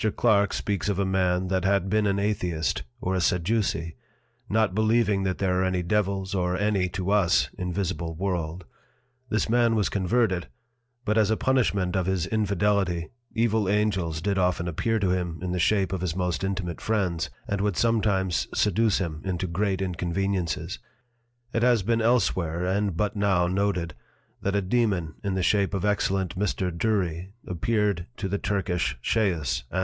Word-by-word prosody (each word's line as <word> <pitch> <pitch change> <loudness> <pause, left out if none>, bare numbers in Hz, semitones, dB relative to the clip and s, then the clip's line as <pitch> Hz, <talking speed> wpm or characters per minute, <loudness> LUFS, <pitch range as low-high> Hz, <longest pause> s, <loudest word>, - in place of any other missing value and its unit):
Clark 100 -4 +3
speaks 100 0 -1
of 100 - 0
a 100 - +1
Man 95 -1 +1
that 95 -1 0
had 100 -1 +2
been 105 +1 +2
an 100 0 +1
Atheist, 90 -6 -1 0.2
or 95 - -1
a 95 - +1
Sadduce, 90 -2 0 0.6
not 110 0 +2
believing 110 -1 +2
that 95 -1 -1
there 95 -1 +1
are - - +2
any 90 -1 0
Devils 95 0 0
or 90 -1 0
any 100 -3 +1
(to 95 +2 -2
us) 100 -5 +3
invisible 90 -2 -3
World; 90 -1 -3 0.6
this 110 - +1
Man 115 0 +3
was 105 -2 +1
converted, 100 -1 +1 0.6
but 105 +1 +2
as 105 -2 +3
a 110 - +2
Punishment 100 -9 +1
of 95 -1 0
his 95 -3 0
Infidelity, 100 -4 0 0.3
evil 110 -3 +2
Angels 95 -6 0
did 100 -1 +1
often 90 -1 +1
appear 110 +7 0
to 100 -4 +1
him 90 -3 -1
in 90 0 -3
the 90 - -1
Shape 95 +1 +2
of 95 - -2
his 90 -3 -2
most 90 -1 -1
intimate 95 -3 -3
Friends, 95 -7 0 0.2
and 100 -1 -1
would 100 -3 0
sometimes 100 -6 +1
seduce 110 +1 +2
him 80 -4 -3
into 95 -1 -2
great 95 +2 -1
Inconveniences. 90 -1 -2 0.7
It 115 - +1
has 120 -4 +4
been 115 +3 +1
elsewhere, 95 -8 +1
and 95 -1 0
but 105 +3 0
now 100 -4 +2
noted, 90 -3 0 0.5
that 100 0 -1
a 100 - +1
Dæmon 95 -6 0
in 100 -2 -1
the 95 - 0
shape 100 +1 +2
of 95 - -1
excellent 95 -2 0
Mr. 95 -2 0
Dury 95 -2 -1
appeared 100 0 0
to 100 - -3
the 100 +1 -2
Turkish 95 -3 -1
Chaos, 80 - 0
_Anno. 95 - -1
95 Hz, 170 wpm, -26 LUFS, 90-105 Hz, 0.7 s, has